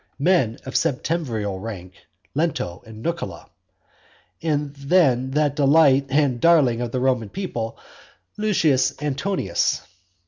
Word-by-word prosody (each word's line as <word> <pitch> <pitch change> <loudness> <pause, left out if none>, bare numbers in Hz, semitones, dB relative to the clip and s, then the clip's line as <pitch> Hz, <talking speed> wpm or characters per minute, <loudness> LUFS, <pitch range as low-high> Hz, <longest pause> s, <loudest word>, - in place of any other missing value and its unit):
Men 140 -8 +2
of 130 - -7
septemviral 125 - -1
rank, 95 -4 -7 0.4
Lento 140 - -2
and 110 0 -11
Nucula, 160 - -4 1.0
and 150 -3 -1
then 140 -4 +2
that 145 0 +1
delight 140 -1 +4
and 135 -4 +1
darling 140 -9 +4
of 120 -1 -3
the 130 - -1
Roman 125 -4 0
people, 115 - -4 0.6
Lucius 165 -14 +1
Antonius. 145 - -1
135 Hz, 110 wpm, -22 LUFS, 115-160 Hz, 1.0 s, delight